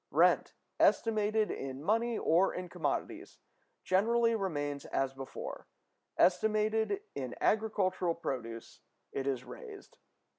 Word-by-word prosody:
Rent, -, -, +3 dB, 0.2 s
estimated 215 Hz, -1 st, +3 dB
in 135 Hz, +1 st, -5 dB
money 230 Hz, +4 st, +1 dB
or 175 Hz, +4 st, +3 dB
in 180 Hz, -1 st, -5 dB
commodities, -, -, -3 dB, 0.5 s
generally 230 Hz, +5 st, +3 dB
remains 145 Hz, -9 st, -2 dB
as 135 Hz, 0 st, -1 dB
before; 135 Hz, 0 st, -7 dB, 0.5 s
estimated 215 Hz, +2 st, +2 dB
in 130 Hz, -3 st, -4 dB
agricultural 190 Hz, -5 st, +1 dB
produce, 115 Hz, -7 st, -5 dB, 0.3 s
it 135 Hz, 0 st, -3 dB
is 135 Hz, -3 st, -1 dB
raised. 430 Hz, -5 st, -11 dB
190 Hz, 105 wpm, -32 LUFS, 140-220 Hz, 0.5 s, Rent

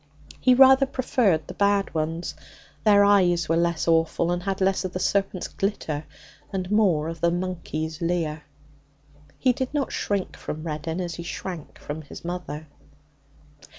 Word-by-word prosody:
He 255 Hz, -1 st, +5 dB
rather 265 Hz, +1 st, +7 dB
preferred 230 Hz, -, +1 dB
the -, -, -8 dB
bad 200 Hz, -1 st, +1 dB
ones; 165 Hz, +2 st, -2 dB, 0.5 s
their 205 Hz, -1 st, +6 dB
eyes 175 Hz, -5 st, +4 dB
were 165 Hz, -, +2 dB
less 170 Hz, -1 st, +1 dB
awful, 165 Hz, +1 st, +2 dB
and 175 Hz, 0 st, -1 dB
had 195 Hz, +1 st, -2 dB
less 195 Hz, 0 st, +2 dB
of 185 Hz, -1 st, -4 dB
the 185 Hz, -, -2 dB
serpent's 195 Hz, -1 st, 0 dB
glitter 160 Hz, -7 st, -3 dB, 0.5 s
and 185 Hz, -1 st, -3 dB
more 185 Hz, -8 st, +3 dB
of 165 Hz, -1 st, -6 dB
the 170 Hz, -, +4 dB
monkey's 170 Hz, -3 st, -3 dB
leer. 165 Hz, -3 st, -1 dB, 1.0 s
He 255 Hz, -2 st, +3 dB
did 260 Hz, +1 st, -3 dB
not 280 Hz, -2 st, 0 dB
shrink 200 Hz, -2 st, -2 dB
from 155 Hz, +1 st, -6 dB
Reddin 160 Hz, +1 st, -3 dB
as 175 Hz, -1 st, -3 dB
he 170 Hz, -, -6 dB
shrank 175 Hz, -2 st, -6 dB
from 150 Hz, +2 st, -6 dB
his 155 Hz, -, -11 dB
mother. 175 Hz, -3 st, -5 dB
175 Hz, 155 wpm, -25 LUFS, 160-200 Hz, 1.0 s, rather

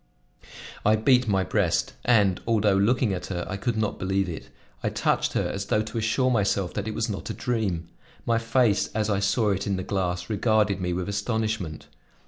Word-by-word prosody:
I 105 Hz, -, +4 dB
beat 125 Hz, +2 st, +3 dB
my 95 Hz, -3 st, +2 dB
breast, -, -, 0 dB
and, 105 Hz, -7 st, +3 dB
although 105 Hz, -3 st, +3 dB
looking 105 Hz, +2 st, +2 dB
at 90 Hz, -, -5 dB
her, 90 Hz, -2 st, -3 dB
I 95 Hz, -, -4 dB
could 110 Hz, +3 st, -2 dB
not 110 Hz, -1 st, -1 dB
believe 95 Hz, +1 st, 0 dB
it. 85 Hz, -3 st, -7 dB, 0.3 s
I -, -, 0 dB
touched -, -, 0 dB
her -, -, 0 dB
as 100 Hz, 0 st, -4 dB
though 105 Hz, -, +2 dB
to 110 Hz, +2 st, -6 dB
assure 130 Hz, +4 st, +1 dB
myself 100 Hz, -5 st, +1 dB
that 105 Hz, +1 st, -3 dB
it 110 Hz, -, -3 dB
was 115 Hz, -, 0 dB
not 100 Hz, -4 st, -5 dB
a -, -, -3 dB
dream. 100 Hz, -9 st, -2 dB, 0.4 s
My 115 Hz, -1 st, +2 dB
face, 115 Hz, -2 st, +2 dB
as 110 Hz, -1 st, 0 dB
I 100 Hz, -, +1 dB
saw 100 Hz, +2 st, +2 dB
it 100 Hz, +1 st, -2 dB
in 100 Hz, -, 0 dB
the 95 Hz, -, -3 dB
glass, 90 Hz, -3 st, -2 dB
regarded 105 Hz, -2 st, +1 dB
me 90 Hz, -1 st, -1 dB
with 90 Hz, 0 st, -2 dB
astonishment. 105 Hz, -5 st, -2 dB
105 Hz, 200 wpm, -26 LUFS, 95-110 Hz, 0.4 s, I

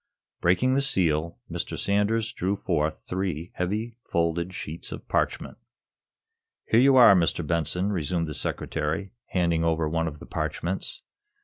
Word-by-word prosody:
Breaking 95 Hz, +9 st, +3 dB
the 140 Hz, -, +3 dB
seal, 85 Hz, -, +1 dB
Mr. -, -, -4 dB
Sanders 105 Hz, +3 st, +1 dB
drew 95 Hz, -2 st, -1 dB
forth 80 Hz, -5 st, -1 dB
three 90 Hz, -3 st, -3 dB
heavy, 105 Hz, +6 st, -2 dB
folded 85 Hz, +1 st, 0 dB
sheets 85 Hz, -3 st, -6 dB
of -, -, -8 dB
parchment. -, -, -1 dB, 1.1 s
"Here 115 Hz, -, +4 dB
you 135 Hz, +1 st, +6 dB
are, 125 Hz, -6 st, +9 dB
Mr. 85 Hz, -2 st, +1 dB
Benson," 85 Hz, +5 st, 0 dB
resumed 85 Hz, -2 st, -1 dB
the 75 Hz, -, -4 dB
Secretary, 80 Hz, +5 st, -2 dB, 0.2 s
handing 85 Hz, -3 st, +1 dB
over 80 Hz, -1 st, +1 dB
one 80 Hz, +1 st, 0 dB
of 75 Hz, -2 st, -5 dB
the -, -, -11 dB
parchments. 80 Hz, +4 st, -3 dB
85 Hz, 140 wpm, -26 LUFS, 80-100 Hz, 1.1 s, are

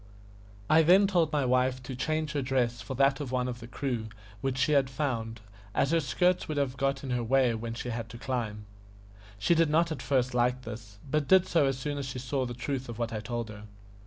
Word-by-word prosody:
I 160 Hz, +1 st, +6 dB
then 185 Hz, +5 st, +6 dB
told 175 Hz, -6 st, +2 dB
my 145 Hz, -3 st, +1 dB
wife 130 Hz, 0 st, +1 dB
to 130 Hz, +1 st, -6 dB
change 155 Hz, +3 st, -1 dB
her 145 Hz, -2 st, -1 dB
dress 125 Hz, -3 st, 0 dB
for 110 Hz, +5 st, -6 dB
that 135 Hz, +1 st, +3 dB
of 140 Hz, -4 st, -5 dB
one 125 Hz, -1 st, 0 dB
of 120 Hz, -1 st, -5 dB
the 115 Hz, -, -9 dB
crew 120 Hz, -2 st, -3 dB, 0.3 s
which 135 Hz, -1 st, -1 dB
she 130 Hz, +3 st, +2 dB
had 140 Hz, -3 st, +3 dB
found, 115 Hz, -6 st, -3 dB, 0.3 s
as 140 Hz, -, +2 dB
her 165 Hz, -, +4 dB
skirts 180 Hz, +6 st, +1 dB
would 155 Hz, -, -3 dB
have 135 Hz, -2 st, 0 dB
got 135 Hz, 0 st, -1 dB
in 135 Hz, -, -4 dB
her 125 Hz, -1 st, 0 dB
way 130 Hz, 0 st, +3 dB
when 115 Hz, +1 st, -4 dB
she 120 Hz, -, -5 dB
had 115 Hz, -1 st, -4 dB
to 115 Hz, -, -9 dB
climb. 115 Hz, -5 st, -3 dB, 0.7 s
She 100 Hz, +12 st, +3 dB
did 165 Hz, -2 st, +3 dB
not 165 Hz, +2 st, +2 dB
at 155 Hz, -, -4 dB
first 130 Hz, -2 st, +1 dB
like 125 Hz, +1 st, +1 dB
this, 110 Hz, -3 st, -9 dB
but 150 Hz, -2 st, +1 dB
did 190 Hz, -1 st, +6 dB
so 160 Hz, -5 st, +3 dB
as 135 Hz, -1 st, 0 dB
soon 145 Hz, +2 st, -3 dB
as 140 Hz, -, -4 dB
she 135 Hz, -1 st, -5 dB
saw 130 Hz, +1 st, -2 dB
the 120 Hz, -, -6 dB
truth 130 Hz, +1 st, -3 dB
of 115 Hz, -, -6 dB
what 115 Hz, -1 st, -2 dB
I 110 Hz, -, -2 dB
told 115 Hz, +1 st, -4 dB
her. 105 Hz, 0 st, -9 dB
130 Hz, 240 wpm, -29 LUFS, 120-145 Hz, 0.7 s, I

